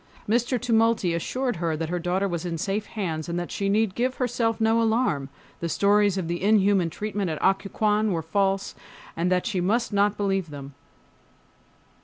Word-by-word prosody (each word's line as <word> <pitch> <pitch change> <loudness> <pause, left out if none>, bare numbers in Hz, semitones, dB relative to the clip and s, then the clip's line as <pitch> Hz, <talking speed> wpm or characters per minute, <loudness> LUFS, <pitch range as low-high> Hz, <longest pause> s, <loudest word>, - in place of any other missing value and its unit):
Mr. 240 +3 +1
Tumulty 225 -6 +2
assured 245 +7 -2
her 165 -2 -1
that 160 0 -3
her 180 0 -1
daughter 185 +3 0
was 170 -3 -3
in 170 -2 -3
safe 200 +5 -2
hands, 165 -7 -4
that 175 0 -3
she 200 -1 -1
need 215 -1 +2
give 255 +4 -1
herself 235 -3 0
no 225 +1 +3
alarm, 220 - +1 0.3
the 170 - -3
stories 205 +1 +3
of 180 -3 -2
the 170 +1 -3
inhuman 200 -3 +3
treatment 205 +1 -3
at 155 - -3
Occoquan 210 +2 +1
were 165 -3 -1
false, 195 +3 0 0.4
and 175 +2 0
that 180 -1 +1
she 195 -6 -1
must 220 +5 0
not 205 +1 +2
believe 195 -4 -1
them. 140 -1 -9
195 Hz, 175 wpm, -25 LUFS, 175-220 Hz, 0.4 s, no